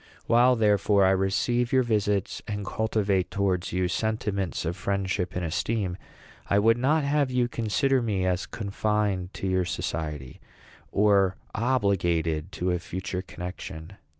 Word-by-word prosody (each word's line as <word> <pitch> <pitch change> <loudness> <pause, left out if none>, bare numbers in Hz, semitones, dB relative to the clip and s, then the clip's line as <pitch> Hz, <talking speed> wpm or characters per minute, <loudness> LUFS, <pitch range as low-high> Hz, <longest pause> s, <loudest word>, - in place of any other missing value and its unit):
While, 125 +2 +5
therefore, 105 -2 +3
I 95 - +5
receive 105 +6 +1
your 130 -1 +4
visits, 105 -4 0
and 105 -1 -3
cultivate 100 -3 0
towards 95 -3 -1
you 90 0 0
sentiments 105 -4 -2
of 85 +2 -2
friendship 95 -1 -2
and 90 -1 -1
esteem, 95 +3 -1 0.5
I 100 - +3
would 115 +3 +4
not 150 +5 +2
have 140 -1 +1
you 125 -1 +1
consider 120 +4 +1
me 100 -5 -1
as 90 0 0
confined 100 -3 -1
to - - -5
your 95 -1 +1
society, 75 -6 -4 0.5
or 100 -2 +3 0.2
obligated 95 -9 0
to 90 +1 -1
a 90 - 0
future 90 +2 -4
connection. 90 -2 -8
100 Hz, 140 wpm, -26 LUFS, 90-110 Hz, 0.5 s, While